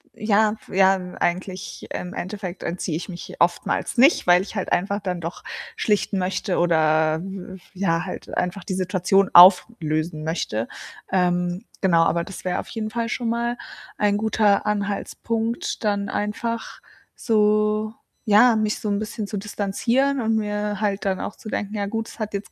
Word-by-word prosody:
Ja, 215 Hz, 0 st, +2 dB
ja, 190 Hz, 0 st, +5 dB, 0.3 s
eigentlich 185 Hz, +1 st, -3 dB
im 180 Hz, +1 st, -5 dB
Endeffekt 185 Hz, -1 st, -5 dB
entziehe 170 Hz, -2 st, -3 dB
ich 175 Hz, -, -5 dB
mich 175 Hz, -2 st, -8 dB
oftmals 175 Hz, +7 st, 0 dB
nicht, 270 Hz, -, +5 dB
weil 180 Hz, +1 st, +6 dB
ich 205 Hz, -, -10 dB
halt 195 Hz, -, -3 dB
einfach 200 Hz, +3 st, +1 dB
dann 185 Hz, -3 st, -3 dB
doch 165 Hz, +2 st, -6 dB, 0.3 s
schlichten 205 Hz, -2 st, 0 dB
möchte 185 Hz, 0 st, -1 dB
oder 160 Hz, -2 st, +3 dB
w 190 Hz, -1 st, -7 dB
f 190 Hz, -, -14 dB
ja, 175 Hz, -3 st, 0 dB
halt -, -, -6 dB
einfach 180 Hz, +1 st, -2 dB
die 190 Hz, -, -3 dB
Situation 185 Hz, +1 st, +2 dB
auflösen 165 Hz, -4 st, +5 dB
möchte. 125 Hz, -9 st, -2 dB, 0.4 s
Ähm, 180 Hz, +1 st, 0 dB, 0.2 s
genau, 170 Hz, -4 st, +4 dB
aber 170 Hz, 0 st, +1 dB
das 190 Hz, 0 st, -9 dB
wäre 180 Hz, -, 0 dB
auf -, -, -7 dB
jeden 215 Hz, -1 st, -4 dB
Fall 230 Hz, 0 st, -2 dB
schon 240 Hz, -1 st, -2 dB
mal 235 Hz, +1 st, -1 dB, 0.4 s
ein 205 Hz, -1 st, +2 dB
guter 210 Hz, -1 st, +2 dB
Anhaltspunkt, 220 Hz, +3 st, -2 dB
dann 200 Hz, -1 st, 0 dB
einfach 225 Hz, +2 st, -3 dB, 0.3 s
so 215 Hz, -1 st, +2 dB, 0.3 s
ja, 225 Hz, +2 st, +6 dB
mich 215 Hz, -1 st, 0 dB
so -, -, -5 dB
'n 200 Hz, -1 st, 0 dB
bisschen 215 Hz, 0 st, -4 dB
zu 210 Hz, -, -5 dB
distanzieren 230 Hz, +7 st, 0 dB
und 225 Hz, -1 st, +1 dB
mir 210 Hz, -1 st, -2 dB
halt 205 Hz, -2 st, -1 dB
dann 190 Hz, -1 st, 0 dB
auch -, -, -5 dB
zu 215 Hz, -, -10 dB
denken: 210 Hz, 0 st, -3 dB
„Ja 200 Hz, -1 st, -1 dB
gut, 225 Hz, +2 st, -3 dB
es -, -, -13 dB
hat 215 Hz, -1 st, -4 dB
jetzt 200 Hz, 0 st, -5 dB
200 Hz, 170 wpm, -23 LUFS, 180-215 Hz, 0.4 s, weil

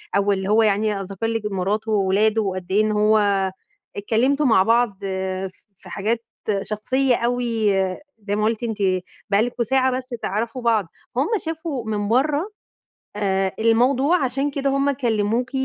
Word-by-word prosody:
أو 200 Hz, +1 st, +2 dB
اللي 190 Hz, 0 st, -1 dB
هو 220 Hz, +2 st, +4 dB
يعني 210 Hz, 0 st, +1 dB
أ -, -, -4 dB
ذكَر 195 Hz, +3 st, -4 dB
لِك 225 Hz, -1 st, -1 dB
مراته 205 Hz, +4 st, -1 dB
وأولاده، 210 Hz, +2 st, +2 dB
وقد 185 Hz, -2 st, -4 dB
إيه 205 Hz, -, +4 dB
إن 215 Hz, 0 st, +1 dB
هو 210 Hz, -2 st, +2 dB, 0.4 s
اتكلَّمتوا 250 Hz, +8 st, +1 dB
مع 225 Hz, -7 st, +5 dB
بعض 230 Hz, -2 st, +2 dB
آآ، 190 Hz, 0 st, -3 dB
ف 185 Hz, -, -13 dB, 0.3 s
في 185 Hz, -, -14 dB
حاجات 225 Hz, +5 st, -2 dB, 0.4 s
شخصية 250 Hz, +6 st, 0 dB
أوي، 235 Hz, -4 st, 0 dB
آآ، 190 Hz, -1 st, -1 dB, 0.2 s
زي 205 Hz, -1 st, -3 dB
ما 210 Hz, -, 0 dB
قُلتِ 225 Hz, +2 st, 0 dB
أنتِ، 225 Hz, -2 st, -2 dB, 0.5 s
بقى 200 Hz, +1 st, +3 dB
لكم 240 Hz, +1 st, -1 dB
ساعة 260 Hz, +2 st, +2 dB
بس 255 Hz, +1 st, -4 dB
تعرفوا 230 Hz, +5 st, -2 dB
بعض. 225 Hz, -6 st, +2 dB, 0.3 s
هُم 275 Hz, -, +2 dB, 0.2 s
شافوا 320 Hz, -7 st, -4 dB
من 205 Hz, -1 st, -1 dB
برّه 290 Hz, -, +1 dB, 0.7 s
آآ، 195 Hz, -2 st, 0 dB
الموضوع، 260 Hz, +8 st, +3 dB
عشان 270 Hz, +3 st, -1 dB
كده 275 Hz, -1 st, -1 dB
هُم 275 Hz, +1 st, +2 dB
كلَّموكِ. 235 Hz, -2 st, 0 dB
220 Hz, 165 wpm, -22 LUFS, 200-250 Hz, 0.7 s, مع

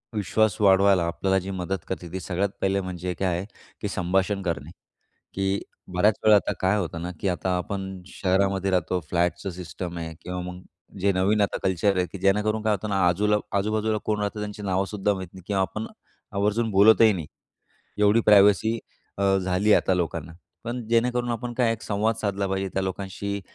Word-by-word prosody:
विश्वास 105 Hz, 0 st, +1 dB
वाढवायला 95 Hz, -2 st, +5 dB
आपल्याला 95 Hz, +3 st, 0 dB
जी 95 Hz, +1 st, -6 dB
मदत 95 Hz, 0 st, -2 dB
करते, 90 Hz, -3 st, -5 dB
ती 95 Hz, -, -4 dB
सगळ्यात 95 Hz, +3 st, -1 dB
पहिले 95 Hz, 0 st, +1 dB
म्हणजे 90 Hz, -1 st, -4 dB
काय 95 Hz, -, +1 dB
आहे 95 Hz, -, -4 dB, 0.4 s
की 105 Hz, -, -1 dB
संभाषण 95 Hz, +2 st, 0 dB
करणे 85 Hz, -5 st, -3 dB, 0.7 s
की 95 Hz, +1 st, 0 dB, 0.3 s
बऱ्याच 105 Hz, +4 st, +4 dB
वेळा 110 Hz, -1 st, +7 dB
आता 100 Hz, -, +1 dB
काय 95 Hz, +3 st, +2 dB
होतं 85 Hz, -4 st, -3 dB
ना 90 Hz, -, -4 dB
की 100 Hz, -, 0 dB
आता 95 Hz, +1 st, -1 dB
आपण 95 Hz, +1 st, -4 dB
शहरामध्ये 95 Hz, 0 st, 0 dB
राहतो. 90 Hz, 0 st, +1 dB
फ्लॅटचं 90 Hz, +2 st, 0 dB
सिस्टम 85 Hz, 0 st, -6 dB
आहे 80 Hz, -1 st, -5 dB
किंवा 90 Hz, 0 st, -4 dB
मग 90 Hz, 0 st, -7 dB, 0.4 s
जे 100 Hz, +1 st, +3 dB
नवीन 95 Hz, +3 st, +2 dB
आता 100 Hz, -, +1 dB
कल्चर 95 Hz, +1 st, +1 dB
आहे 90 Hz, -1 st, +1 dB
की 100 Hz, -, -6 dB
जेणेकरून 105 Hz, +3 st, +1 dB
काय 110 Hz, 0 st, +2 dB
होतं 105 Hz, +1 st, -2 dB
ना, 100 Hz, -1 st, 0 dB
आजूला 105 Hz, +4 st, +2 dB, 0.2 s
आजू-बाजूला 110 Hz, +2 st, 0 dB
कोण 105 Hz, -1 st, 0 dB
राहतं 105 Hz, +1 st, -2 dB
त्यांची 105 Hz, 0 st, -6 dB
नावसुद्धा 100 Hz, +1 st, 0 dB
माहीत 95 Hz, -2 st, -6 dB
नाही 95 Hz, -, -11 dB
किंवा 100 Hz, -2 st, 0 dB
आपण 110 Hz, +3 st, -3 dB, 0.5 s
आवर्जून 105 Hz, +3 st, +1 dB
बोलतही 110 Hz, +2 st, +6 dB
नाही. 85 Hz, -6 st, -4 dB, 0.7 s
एवढी 105 Hz, +2 st, +4 dB
प्रायव्हसी 105 Hz, +2 st, +5 dB, 0.4 s
अ, 100 Hz, -1 st, +3 dB
झाली 95 Hz, +3 st, +2 dB
आता 95 Hz, -, +2 dB
लोकांना. 85 Hz, -3 st, -3 dB, 0.3 s
पण 120 Hz, +1 st, -3 dB
जेणेकरून 120 Hz, +1 st, +1 dB
आपण 120 Hz, +1 st, -3 dB
काय 120 Hz, -2 st, +2 dB
एक 115 Hz, -1 st, -7 dB
संवाद 110 Hz, +2 st, 0 dB
साधला 100 Hz, -2 st, -1 dB
पाहिजे 95 Hz, 0 st, -1 dB
त्या 95 Hz, -, 0 dB
लोकांशी. 100 Hz, +1 st, -4 dB
95 Hz, 180 wpm, -25 LUFS, 95-105 Hz, 0.7 s, वेळा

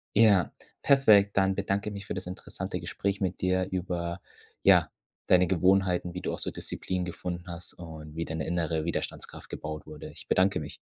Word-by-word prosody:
Ja, 100 Hz, -4 st, +5 dB, 0.3 s
perfekt. 105 Hz, -8 st, +5 dB
Dann 95 Hz, 0 st, +4 dB
bedanke 100 Hz, +1 st, -1 dB
ich -, -, -7 dB
mich 100 Hz, -1 st, -7 dB
für -, -, -2 dB
das 95 Hz, -, -5 dB
interessante 90 Hz, -, -5 dB
Gespräch 100 Hz, +1 st, -2 dB
mit 95 Hz, -1 st, -1 dB
dir 95 Hz, 0 st, +2 dB
über, 90 Hz, -1 st, -2 dB, 0.4 s
ja, -, -, +6 dB, 0.4 s
deine 90 Hz, 0 st, +6 dB
Gewohnheiten, 90 Hz, 0 st, +2 dB
wie 90 Hz, -, -4 dB
du -, -, -2 dB
auch -, -, -3 dB
so -, -, 0 dB
Disziplin 90 Hz, -1 st, -3 dB
gefunden 90 Hz, 0 st, -5 dB
hast 85 Hz, 0 st, -6 dB
und 80 Hz, -3 st, -10 dB
wie 85 Hz, +1 st, -2 dB
deine 80 Hz, 0 st, -3 dB
innere 80 Hz, -2 st, 0 dB
Widerstandskraft 85 Hz, -, -4 dB
gebaut 75 Hz, -1 st, -6 dB
wurde. 75 Hz, -, -9 dB
Ich -, -, -11 dB
bedanke 95 Hz, +1 st, +3 dB
mich. -, -, -7 dB
90 Hz, 180 wpm, -29 LUFS, 85-95 Hz, 0.4 s, ja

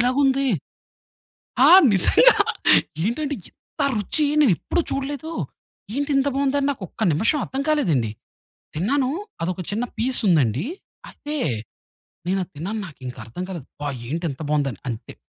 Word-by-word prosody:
ఇలాగుంది! 270 Hz, +2 st, +2 dB, 1.2 s
ఆ! -, -, +8 dB, 0.2 s
నిజంగా -, -, +6 dB, 0.7 s
ఏంటంటే 285 Hz, +6 st, -1 dB
ఇంత 300 Hz, -, -10 dB
రుచి 215 Hz, +9 st, +1 dB, 0.2 s
నేనెప్పుడు 265 Hz, -, +2 dB
చూడలేదూ, 285 Hz, +4 st, -3 dB, 0.6 s
ఏంటింత 285 Hz, -1 st, +1 dB
బావుందని 280 Hz, 0 st, +1 dB
నాకొక్క 220 Hz, -, -6 dB
నిమిషం 220 Hz, -, +2 dB
అర్థం 270 Hz, -, -3 dB
కాలేదండి. 160 Hz, -, +1 dB, 0.6 s
తిన్నానూ, 255 Hz, -, +1 dB, 0.3 s
అదొక 180 Hz, +2 st, -2 dB
చిన్న 220 Hz, +4 st, -1 dB
పీసుందండీ, 175 Hz, -, +2 dB, 0.4 s
అయితే 300 Hz, +1 st, -6 dB, 0.9 s
నేనది 190 Hz, 0 st, -1 dB
తిన్నాను, 200 Hz, +8 st, -4 dB
నాకింకా 130 Hz, -7 st, -9 dB
అర్థం 120 Hz, +11 st, -7 dB
కాలేదు, 170 Hz, -8 st, -7 dB
అబ్బా! 145 Hz, 0 st, -5 dB, 0.2 s
ఏంటింత 160 Hz, -1 st, -3 dB
బాగుందని. 140 Hz, -8 st, 0 dB
అంతే, 115 Hz, -, -7 dB
220 Hz, 110 wpm, -23 LUFS, -, 1.2 s, ఆ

